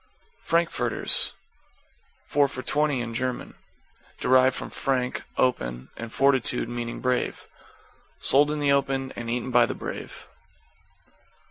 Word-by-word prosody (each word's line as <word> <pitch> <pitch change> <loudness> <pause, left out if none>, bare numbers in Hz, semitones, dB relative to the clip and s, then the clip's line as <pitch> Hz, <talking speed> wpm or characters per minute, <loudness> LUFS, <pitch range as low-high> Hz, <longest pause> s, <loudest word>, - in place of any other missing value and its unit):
=FRANKFURTERS= 165 -8 0 0.9
Four 145 -1 +3
for 130 -2 -7
twenty, 145 -2 +1
in 115 -1 -4
German. 130 +1 -3 0.7
Derived 130 0 +4
from - - -5
frank, 130 -2 -1
open, 60 - 0
and 115 -1 -7
fortitude, 135 -3 +2
meaning 120 0 -4
brave. 125 -1 -1 0.7
Sold 145 +2 +4
in 150 - -1
the 145 -1 +2
open 135 -1 +1
and 120 -1 -5
eaten 125 +2 -2
by 120 -1 +5
the - - -4
brave. - - -7
130 Hz, 120 wpm, -26 LUFS, 120-140 Hz, 0.9 s, by